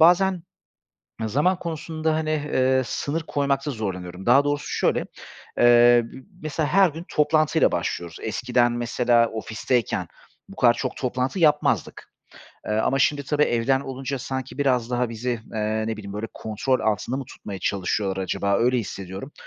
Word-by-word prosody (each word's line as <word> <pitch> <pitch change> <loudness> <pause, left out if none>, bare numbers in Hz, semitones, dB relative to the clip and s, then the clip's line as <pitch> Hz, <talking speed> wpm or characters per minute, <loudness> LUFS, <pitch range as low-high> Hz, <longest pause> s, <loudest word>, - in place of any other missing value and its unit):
bazen 180 +2 +5 0.8
zaman 150 - +1
konusunda, 160 -1 -2
hani, 155 0 -1
eee, 130 -4 +1
sınır 155 +6 -3
koymakta 140 -1 -1
zorlanıyorum. 95 -5 -5
Daha 130 +4 +6
doğrusu 145 0 -1
şöyle, - - 0 0.5
eee, 120 0 +6
b - - -9 0.3
mesela 155 0 -1
her 190 +2 +5
gün 165 +3 -9
toplantıyla 155 0 +3
başlıyoruz. 85 -1 -3
Eskiden, 120 +2 +1
mesela, 120 0 +2
ofisteyken 110 +2 -1 0.4
bu - - -11
kadar 120 -1 +5
çok 130 +2 -4
toplantı 130 +5 -2
yapmazdık. 150 -3 +1 0.5
Eee, - - -1
ama 110 +5 +1
şimdi 140 +1 +2
tabii 150 +2 +1
evden 130 0 +2
olunca 135 0 -4
sanki 130 +1 -5
biraz 125 -4 +1
daha 125 -1 0
bizi, 115 +2 -4 0.2
eee, 110 0 -1
ne 110 0 -2
bileyim, 100 -2 -8
böyle, 105 +2 -4
kontrol 110 +4 -1
altında 110 +3 -1
mı 135 - -4
tutmaya 100 -4 -8
çalışıyorlar 95 0 -1
acaba, 100 +1 0
öyle 125 +2 +2
hissediyorum. 95 - -6
125 Hz, 150 wpm, -24 LUFS, 110-145 Hz, 0.8 s, Daha